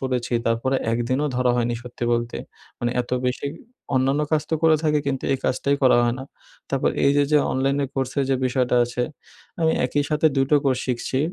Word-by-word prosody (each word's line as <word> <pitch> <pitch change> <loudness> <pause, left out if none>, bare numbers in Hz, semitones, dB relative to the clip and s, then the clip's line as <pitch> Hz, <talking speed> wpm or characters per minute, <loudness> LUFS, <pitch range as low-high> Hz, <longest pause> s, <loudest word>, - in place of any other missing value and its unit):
পড়েছি 130 -2 -2
তারপরে 115 +4 +1 0.2
১ 115 - 0
দিনও 135 +4 +1
ধরা 125 0 +2
হয়নি 120 0 0
সত্যি 120 0 -6
বলতে, 120 0 -1 0.4
মানে 120 0 -1
এত 120 - -6 0.2
বেশি 125 +2 -2 0.5
অন্যান্য 135 +3 +2
কাজ 155 -2 +2
তো - - +2
করে 160 -1 +5
থাকি 150 -1 +2
কিন্তু 135 -2 -2
এই 135 - 0
কাজটাই 140 +2 +1
করা 130 -2 +6
হয় 120 0 +1
না, 130 - -6 0.5
তারপর 135 -1 +1
এইযে 140 +1 +4
যে 150 - +6
অনলাইনে 135 +2 +1
কোর্সের 135 +1 -1
যে 135 - +3
বিষয়টা 125 -1 +1
আছে, 120 +1 -3 0.6
আমি 160 -1 +3
একই 145 +3 0
সাথে 150 +1 +3
২ 135 - +4
টো 150 - +6
কোর্স 130 -2 +1
শিখছি। 125 +1 -2
130 Hz, 195 wpm, -23 LUFS, 125-140 Hz, 0.6 s, করা